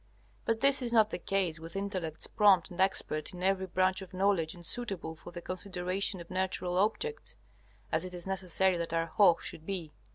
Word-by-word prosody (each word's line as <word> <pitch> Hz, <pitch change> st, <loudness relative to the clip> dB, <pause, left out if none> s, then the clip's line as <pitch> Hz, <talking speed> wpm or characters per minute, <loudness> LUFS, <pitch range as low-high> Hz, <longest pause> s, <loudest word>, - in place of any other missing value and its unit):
But 225 Hz, -1 st, 0 dB
this 275 Hz, 0 st, +4 dB
is 240 Hz, -2 st, -1 dB
not 220 Hz, -2 st, +4 dB
the -, -, -3 dB
case 180 Hz, -4 st, -1 dB
with 165 Hz, +2 st, -9 dB
intellects 185 Hz, -6 st, -3 dB
prompt 200 Hz, -4 st, +4 dB
and 175 Hz, -, -3 dB
expert 185 Hz, -3 st, 0 dB
in 180 Hz, -, -7 dB
every 190 Hz, 0 st, +1 dB
branch 185 Hz, +1 st, +1 dB
of 185 Hz, -1 st, -10 dB
knowledge 185 Hz, -4 st, +1 dB
and 175 Hz, -1 st, -9 dB
suitable 195 Hz, -9 st, -2 dB
for 160 Hz, -, -11 dB
the 175 Hz, 0 st, -8 dB
consideration 185 Hz, +1 st, -1 dB
of 170 Hz, +1 st, -11 dB
natural 185 Hz, -1 st, -1 dB
objects, 445 Hz, -, -1 dB, 0.5 s
as 160 Hz, -, +1 dB
it 180 Hz, -1 st, -6 dB
is 175 Hz, -, -2 dB
necessary 190 Hz, -1 st, +1 dB
that 170 Hz, -1 st, -3 dB
our 165 Hz, 0 st, +1 dB
Hoh 170 Hz, +1 st, +5 dB
should 155 Hz, -, -5 dB
be. 170 Hz, -4 st, -5 dB
185 Hz, 195 wpm, -31 LUFS, 170-195 Hz, 0.5 s, Hoh